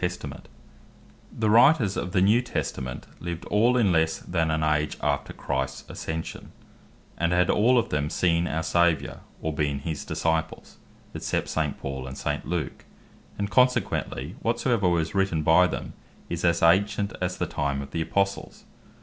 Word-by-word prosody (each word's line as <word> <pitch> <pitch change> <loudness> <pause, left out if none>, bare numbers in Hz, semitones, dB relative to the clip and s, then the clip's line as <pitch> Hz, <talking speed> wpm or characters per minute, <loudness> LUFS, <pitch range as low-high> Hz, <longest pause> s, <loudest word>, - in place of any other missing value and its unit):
The 90 - +3
New - - -4
Testament 90 - -9 0.9
The 110 -1 +1
Writers 120 -3 +5
of 90 - -3
the 90 - +2
New 110 +5 +5
Testament 65 - -4
lived 85 -1 -5
all 115 +4 +3
in 105 -6 +3
lesse 80 -1 +2
then 80 -2 -1
an 80 0 0
age 75 0 0
after - - -1
Christs 65 0 -3
Ascension, 80 0 -6 0.7
and 85 0 +1
had 90 0 +3
all 125 +4 +4
of 115 -1 +1
them 75 0 -1
seen 85 0 +1
our 80 +1 -2
Saviour, 85 -4 +1 0.2
or 80 - -1
been 75 -2 0
his 75 +2 -4
Disciples, 80 -1 -2 0.4
except - - -2
St. 75 -3 -1
Paul, 65 -1 -5
and 65 - -8
St. - - -3
Luke; 85 -2 -3 0.5
and 100 0 -3
consequently 95 - +1
whatsoever 115 -4 +1
was 80 -2 0
written 95 -6 +1
by 80 +4 +5
them, - - -5 0.4
is 85 0 -3
as 85 -1 +2
ancient 100 +4 +3
as 90 0 -1
the - - -1
time 70 -1 -2
of 70 0 -7
the 80 - -2
Apostles. 100 +4 -2
85 Hz, 165 wpm, -26 LUFS, 80-100 Hz, 0.9 s, Writers